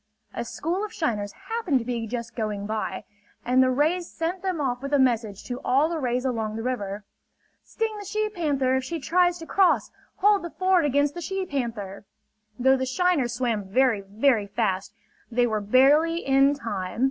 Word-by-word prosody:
A 235 Hz, -, -3 dB
school 335 Hz, -, -3 dB
of 425 Hz, -, -4 dB
shiners 220 Hz, -, -2 dB, 0.2 s
happened 450 Hz, -, 0 dB
to 235 Hz, -, -3 dB
be 235 Hz, -2 st, -3 dB
just 235 Hz, +1 st, -5 dB
going 210 Hz, -3 st, -3 dB
by; 215 Hz, +1 st, -3 dB, 0.4 s
and 255 Hz, +2 st, +4 dB
the 260 Hz, -, +4 dB
rays 315 Hz, +7 st, +1 dB
sent 340 Hz, +3 st, -3 dB
them 375 Hz, -4 st, -2 dB
off 250 Hz, -3 st, -1 dB
with 275 Hz, +1 st, -5 dB
a -, -, +5 dB
message 230 Hz, -6 st, +1 dB
to 245 Hz, 0 st, -6 dB
all 280 Hz, +5 st, +3 dB
the 335 Hz, -1 st, -2 dB
rays 250 Hz, -1 st, -1 dB
along 220 Hz, -4 st, -2 dB
the 225 Hz, -, -4 dB
river: 205 Hz, -5 st, -3 dB, 0.6 s
"Sting 445 Hz, -1 st, -3 dB
the 410 Hz, -, -8 dB
she 430 Hz, +2 st, -1 dB
panther 290 Hz, -10 st, 0 dB
if 260 Hz, -, 0 dB
she 330 Hz, +5 st, -4 dB
tries 350 Hz, +4 st, +2 dB
to 330 Hz, -, -9 dB
cross! 380 Hz, +2 st, +2 dB, 0.2 s
Hold 410 Hz, 0 st, +3 dB
the 345 Hz, -, -5 dB
ford 370 Hz, -1 st, +2 dB
against 285 Hz, +1 st, +2 dB
the 345 Hz, -, -6 dB
she 385 Hz, +3 st, -3 dB
panther!" 230 Hz, -, -4 dB, 0.5 s
Though 265 Hz, +2 st, +4 dB
the 260 Hz, 0 st, -2 dB
shiners 290 Hz, -5 st, +1 dB
swam 235 Hz, -5 st, -1 dB
very, 230 Hz, +1 st, +2 dB
very 210 Hz, +2 st, +1 dB
fast, 200 Hz, -2 st, -1 dB, 0.4 s
they 245 Hz, +1 st, +3 dB
were 215 Hz, -3 st, -1 dB
barely 290 Hz, +10 st, +4 dB
in 275 Hz, +1 st, +4 dB
time. 205 Hz, -7 st, -5 dB
260 Hz, 190 wpm, -25 LUFS, 230-335 Hz, 0.6 s, a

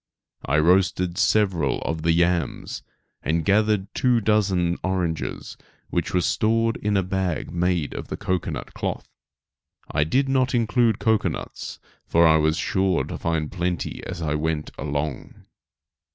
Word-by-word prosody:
I 70 Hz, +3 st, +2 dB
roasted 90 Hz, +2 st, +2 dB
several 95 Hz, -9 st, +2 dB
of 80 Hz, -1 st, -2 dB
the 85 Hz, +1 st, +2 dB
yams, 85 Hz, -3 st, 0 dB, 0.4 s
and 80 Hz, +1 st, 0 dB
gathered 105 Hz, -1 st, +2 dB
two 125 Hz, -3 st, +3 dB
dozen 95 Hz, -5 st, +1 dB
oranges 90 Hz, -4 st, -2 dB, 0.3 s
which 85 Hz, -, -1 dB
were 90 Hz, -, +2 dB
stored 115 Hz, +4 st, +1 dB
in 105 Hz, -1 st, 0 dB
a 95 Hz, -, +2 dB
bag 95 Hz, -2 st, -2 dB
made 85 Hz, -3 st, 0 dB
of -, -, -6 dB
the -, -, -5 dB
cocoanut 90 Hz, -2 st, -3 dB
cloth. -, -, -4 dB, 0.8 s
I 75 Hz, -, +2 dB
did 130 Hz, -, +1 dB
not 130 Hz, -1 st, +1 dB
include 115 Hz, -1 st, +2 dB
cocoanuts, 110 Hz, -2 st, -1 dB, 0.3 s
for 85 Hz, 0 st, +4 dB
I 80 Hz, -1 st, +6 dB
was 80 Hz, +1 st, +2 dB
sure 95 Hz, -2 st, +1 dB
to -, -, -6 dB
find 80 Hz, -2 st, -1 dB
plenty 90 Hz, -1 st, -3 dB
as 90 Hz, -2 st, -5 dB
I 75 Hz, -2 st, 0 dB
went 75 Hz, 0 st, -2 dB
along. 70 Hz, 0 st, -4 dB
90 Hz, 140 wpm, -24 LUFS, 80-105 Hz, 0.8 s, I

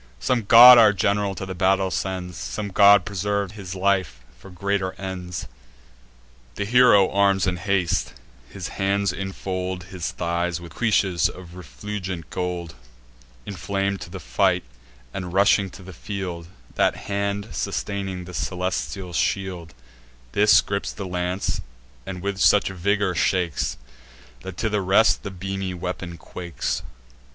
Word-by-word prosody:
Some 120 Hz, -4 st, 0 dB
god 120 Hz, +3 st, +10 dB
our 110 Hz, -2 st, +6 dB
general 100 Hz, 0 st, 0 dB
to 95 Hz, -, -5 dB
the 95 Hz, -, -5 dB
battle 95 Hz, +1 st, +1 dB
sends; 90 Hz, -2 st, -3 dB
Some 105 Hz, -1 st, -5 dB
god 100 Hz, -1 st, +6 dB
preserves 100 Hz, 0 st, -2 dB
his 95 Hz, -3 st, -7 dB
life 95 Hz, -10 st, 0 dB, 0.2 s
for 95 Hz, -, -13 dB
greater 95 Hz, +1 st, -2 dB
ends." 90 Hz, -2 st, -6 dB, 1.1 s
The 100 Hz, -, -2 dB
hero 115 Hz, -4 st, +5 dB
arms 100 Hz, -1 st, +3 dB
in 90 Hz, -1 st, -1 dB
haste; 90 Hz, -4 st, 0 dB, 0.3 s
his -, -, -6 dB
hands 100 Hz, -1 st, 0 dB
infold 95 Hz, -1 st, -4 dB
His 90 Hz, -3 st, -3 dB
thighs 85 Hz, 0 st, -2 dB
with 85 Hz, -1 st, -11 dB
cuishes 100 Hz, -6 st, +2 dB
of 90 Hz, -2 st, -11 dB
refulgent 90 Hz, +3 st, -6 dB
gold: 90 Hz, -2 st, -3 dB, 0.7 s
Inflam'd 100 Hz, +1 st, -2 dB
to -, -, -7 dB
fight, -, -, +1 dB, 0.5 s
and 90 Hz, -2 st, -5 dB
rushing 100 Hz, 0 st, +4 dB
to 95 Hz, +1 st, -13 dB
the 95 Hz, 0 st, -10 dB
field, 90 Hz, -2 st, -6 dB, 0.3 s
That -, -, +2 dB
hand 100 Hz, +1 st, -2 dB
sustaining 95 Hz, -3 st, -3 dB
the 90 Hz, -, -10 dB
celestial 90 Hz, -1 st, -3 dB
shield, 90 Hz, -3 st, -2 dB, 0.6 s
This 105 Hz, +1 st, +5 dB
gripes 100 Hz, 0 st, -3 dB
the 100 Hz, -, -6 dB
lance, 90 Hz, +1 st, -2 dB, 0.5 s
and 90 Hz, -1 st, -6 dB
with 100 Hz, -1 st, -3 dB
such 105 Hz, 0 st, +4 dB
vigour 100 Hz, +1 st, 0 dB
shakes, 90 Hz, -2 st, 0 dB, 0.6 s
That 95 Hz, +4 st, -8 dB
to 110 Hz, -, 0 dB
the 105 Hz, -1 st, 0 dB
rest 95 Hz, +4 st, +4 dB
the 100 Hz, -, -5 dB
beamy 95 Hz, 0 st, -4 dB
weapon 90 Hz, -1 st, -5 dB
quakes. 85 Hz, +2 st, -4 dB
95 Hz, 135 wpm, -23 LUFS, 90-100 Hz, 1.1 s, god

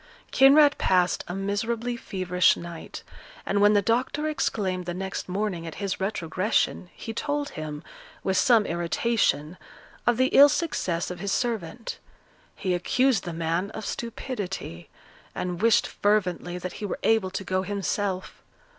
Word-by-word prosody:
Kinraid 285 Hz, +2 st, +6 dB
passed 180 Hz, -1 st, +2 dB
a 175 Hz, -, -4 dB
miserably 225 Hz, +5 st, -2 dB
feverish 185 Hz, -5 st, +1 dB
night, 170 Hz, -1 st, -8 dB, 0.4 s
and 200 Hz, +1 st, +1 dB
when 205 Hz, +1 st, +6 dB
the 205 Hz, -1 st, +3 dB
doctor 255 Hz, +7 st, 0 dB
exclaimed 195 Hz, -, -1 dB
the 175 Hz, -, -3 dB
next 190 Hz, 0 st, -4 dB
morning 185 Hz, -3 st, -2 dB
at 165 Hz, -, -7 dB
his 200 Hz, -2 st, -3 dB
retrogression, 185 Hz, -1 st, -1 dB
he 225 Hz, -, -6 dB
told 290 Hz, +4 st, -2 dB
him, 155 Hz, 0 st, -6 dB, 0.4 s
with 190 Hz, -, 0 dB
some 225 Hz, 0 st, +4 dB
irritation, 170 Hz, -2 st, 0 dB, 0.5 s
of 240 Hz, -1 st, +4 dB
the 260 Hz, +1 st, +3 dB
ill 285 Hz, +1 st, +8 dB
success 180 Hz, -, -1 dB
of 180 Hz, -, -7 dB
his 200 Hz, +1 st, -2 dB
servant; 225 Hz, -2 st, -2 dB, 0.6 s
he 185 Hz, -, -1 dB
accused 250 Hz, +7 st, +2 dB
the 175 Hz, -, -3 dB
man 165 Hz, +3 st, -1 dB
of 220 Hz, -, -6 dB
stupidity, 205 Hz, -, -5 dB, 0.5 s
and 180 Hz, 0 st, -3 dB
wished 230 Hz, -1 st, +4 dB
fervently 180 Hz, -4 st, 0 dB
that 180 Hz, 0 st, -5 dB
he -, -, -2 dB
were -, -, -3 dB
able 220 Hz, -4 st, +3 dB
to 195 Hz, -, -4 dB
go 185 Hz, 0 st, 0 dB
himself. 195 Hz, -1 st, -3 dB
195 Hz, 145 wpm, -26 LUFS, 180-230 Hz, 0.6 s, ill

